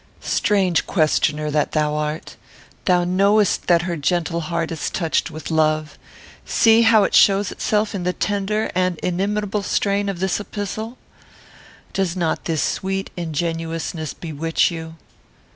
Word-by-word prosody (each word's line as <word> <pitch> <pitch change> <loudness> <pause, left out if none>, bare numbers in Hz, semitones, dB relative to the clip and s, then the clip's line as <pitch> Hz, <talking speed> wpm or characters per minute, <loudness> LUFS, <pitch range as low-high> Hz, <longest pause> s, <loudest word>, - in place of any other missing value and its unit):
"Strange 190 -5 +1
questioner 155 -2 +1
that 150 0 0
thou 150 -1 +1
art. 150 +1 -3 0.5
Thou 180 -2 +3
knowest 200 +4 +2
that 175 -1 +4
her 175 -1 -2
gentle 170 +2 -1
heart 165 +1 -2
is 160 - -3
touched 165 -4 -1
with 155 +1 -7
love. 155 -1 +1 0.5
See 225 0 +4
how 225 -2 +5
it - - -1
shows 195 0 +5
itself 210 0 0
in 195 - -3
the 180 +1 0
tender 205 +2 -1
and 185 -1 0
inimitable 205 +3 -1
strain 200 +1 0
of 190 -3 -4
this 190 +1 0
epistle. 215 +3 -5 1.0
Does 190 -2 -1
not 170 -3 -1
this 160 -3 0
sweet 195 +1 -2
ingenuousness 165 -1 -3
bewitch 165 0 0
you?" 160 -1 -7
175 Hz, 140 wpm, -21 LUFS, 160-200 Hz, 1.0 s, how